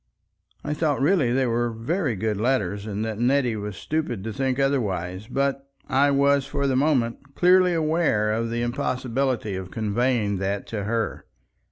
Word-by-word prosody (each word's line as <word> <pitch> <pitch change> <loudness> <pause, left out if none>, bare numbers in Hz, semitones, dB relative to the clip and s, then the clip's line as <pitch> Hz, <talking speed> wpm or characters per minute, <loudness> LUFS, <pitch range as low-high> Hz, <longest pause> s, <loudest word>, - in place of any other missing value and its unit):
I 150 - -2
thought 150 -1 0
really 145 -3 +3
they 130 +1 +2
were 120 0 0
very 125 - -1
good 105 +1 -1
letters, 105 -4 0
and 105 +1 -3
that 110 -1 -4
Nettie 125 -1 +2
was 105 -1 -5
stupid 150 - -2
to 110 0 -4
think 130 0 -1
otherwise, 105 -9 -1
but 140 +1 -1 0.2
I 140 +2 +3
was 140 0 +3
for 140 -1 -2
the 135 -2 +1
moment 135 -1 0
clearly 180 0 +5
aware 155 -10 +1
of 115 +1 -1
the 120 +1 -1
impossibility 125 -2 -1
of 95 -1 -6
conveying 110 -1 0
that 100 +1 -2
to 105 -3 -3
her. 115 0 -2
120 Hz, 165 wpm, -24 LUFS, 105-140 Hz, 0.2 s, clearly